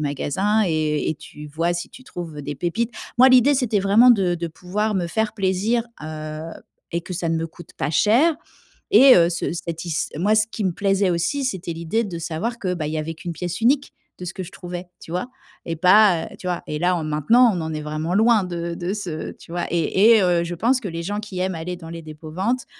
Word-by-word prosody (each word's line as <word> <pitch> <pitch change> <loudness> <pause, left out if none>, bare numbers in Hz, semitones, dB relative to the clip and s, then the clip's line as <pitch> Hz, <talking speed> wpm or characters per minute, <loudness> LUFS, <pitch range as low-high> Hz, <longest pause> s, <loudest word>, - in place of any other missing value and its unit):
magasin 185 +9 0
et 155 -2 0
et - - -2
tu 150 0 -11
vois 165 +4 -1
si 175 - -4
tu 260 - -13
trouves 170 - -7
des 145 - -5
pépites. 205 - -2 0.3
Moi, 260 +1 +8
l'idée, 255 +3 +6
c'était 245 -6 +1
vraiment 210 +6 +6
de 190 -6 +3
de 170 0 -3
pouvoir 200 +6 -2
me 180 -3 0
faire 220 +5 -1
plaisir, 205 +4 0 0.2
heu, 155 0 -6 0.5
et 170 - 0
que 180 - -8
ça 170 -1 -2
ne 165 - +1
me 165 - -2
coûte 175 +1 -14
pas - - -1
cher. 235 - +4 0.6
Et, 275 -9 +8
heu, 170 -1 +5
ce 170 - -2
satis 165 -1 -3
moi 205 +6 +2
ce 215 0 +3
qui 215 - -4
me 185 - +1
plaisait 195 0 +1
aussi, 175 - 0
c'était 190 -8 -3
l'idée 170 +8 -1
de 175 -4 -5
savoir 175 +9 -3
que, 180 -4 -2
bah, 155 -3 -3
il 155 - -4
y 155 - -1
avait 160 +1 -4
qu'une 170 +2 -6
pièce 175 +3 -4
unique 275 +5 +2 0.3
de 180 - -7
ce 180 - -5
que 185 - -5
je 180 - -12
trouvais, 180 0 -7 0.2
tu - - -11
vois, 180 +6 -2 0.4
et 165 - -3
pas, 185 0 +5
heu - - -12
tu - - -9
vois, 180 -1 -2
et 150 - -3
là 180 +2 +2
en 170 - -2
maintenant, 155 - +4
on 180 - -2
en 160 -1 -4
est 155 - -3
vraiment 155 +3 -3
loin 220 0 +4
de 170 -1 -4
de 175 +2 -3
ce 175 -7 -5
tu - - -17
vois 175 +1 -2
et 190 +7 +4
et, 205 - +3
heu, 175 -2 +2
je 175 +1 -4
pense 240 +8 +2
que 210 - -6
les 165 -1 -5
gens 205 +4 -3
qui 205 -4 -6
aiment 185 -2 -1
aller 175 +3 -4
dans 165 -2 -11
les 170 0 -7
dépôts-ventes 165 +11 -3
180 Hz, 240 wpm, -22 LUFS, 165-210 Hz, 0.6 s, Moi